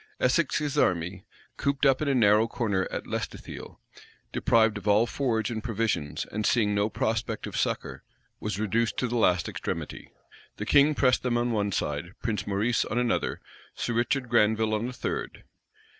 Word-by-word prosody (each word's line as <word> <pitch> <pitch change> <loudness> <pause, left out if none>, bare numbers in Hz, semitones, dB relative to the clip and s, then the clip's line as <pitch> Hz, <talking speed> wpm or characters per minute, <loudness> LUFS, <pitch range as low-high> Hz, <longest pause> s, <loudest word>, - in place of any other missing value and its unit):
Essex's 145 +1 +1
army, 90 +1 0 0.3
cooped 140 0 0
up 135 0 +4
in 155 - 0
a 140 - +2
narrow 110 -1 +5
corner 110 -6 -1
at - - -5
Lestithiel, - - -6 0.5
deprived 110 -2 +3
of 105 - -10
all 105 +3 +5
forage 120 -3 -1
and 110 -2 -4
provisions, 110 -10 -1
and 105 +1 -2
seeing 105 -2 +2
no 100 +1 +1
prospect 110 0 -2
of - - -7
succor, - - -2 0.4
was 105 -2 -3
reduced 110 +2 0
to 125 - 0
the 120 - -3
last 90 -7 +3
extremity. - - -5 0.5
The 105 - -4
king 145 +5 +5
pressed 130 -2 +3
them 120 -2 0
on 120 0 0
one 105 -2 0
side; 85 +1 -3
Prince 105 -3 -2
Maurice 105 +4 +1
on 115 - -3
another; 125 -1 0 0.3
Sir 120 - -2
Richard 125 +3 0
Granville 110 -1 +2
on 110 +3 -1
a - - -5
third. - - -4
110 Hz, 170 wpm, -27 LUFS, 105-120 Hz, 0.5 s, narrow